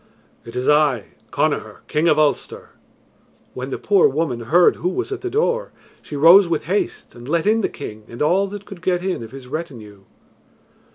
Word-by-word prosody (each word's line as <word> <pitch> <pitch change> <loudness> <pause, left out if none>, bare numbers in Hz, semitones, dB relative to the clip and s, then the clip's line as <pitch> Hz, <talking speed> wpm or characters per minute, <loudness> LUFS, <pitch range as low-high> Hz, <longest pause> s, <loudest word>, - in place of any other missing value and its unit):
"It 115 +1 -10
is 125 +1 -2
I, 150 -7 +2 0.2
Connachar, - - -2
King 155 +3 +1
of 155 -2 +4
Ulster." 150 -1 0 0.8
When 130 +1 -6
the - - -3
poor 200 -3 +4
woman 140 -4 -2
heard 165 +10 +3
who 180 - -1
was 370 - -3
at 400 - -4
the 370 - -3
door, 475 +5 -1 0.3
she 150 - -9
rose 170 +6 +7
with 165 -2 -1
haste 190 +6 -3
and 120 +2 -11
let 165 0 +1
in 220 +2 +3
the - - 0
king 110 -6 -9
and 120 - -11
all 185 +6 +2
that 200 0 -8
could 195 -4 -11
get 180 -1 -1
in 190 -9 -2
of 115 - -8
his 135 -1 -11
retinue. 120 -10 -8
155 Hz, 190 wpm, -20 LUFS, 130-190 Hz, 0.8 s, rose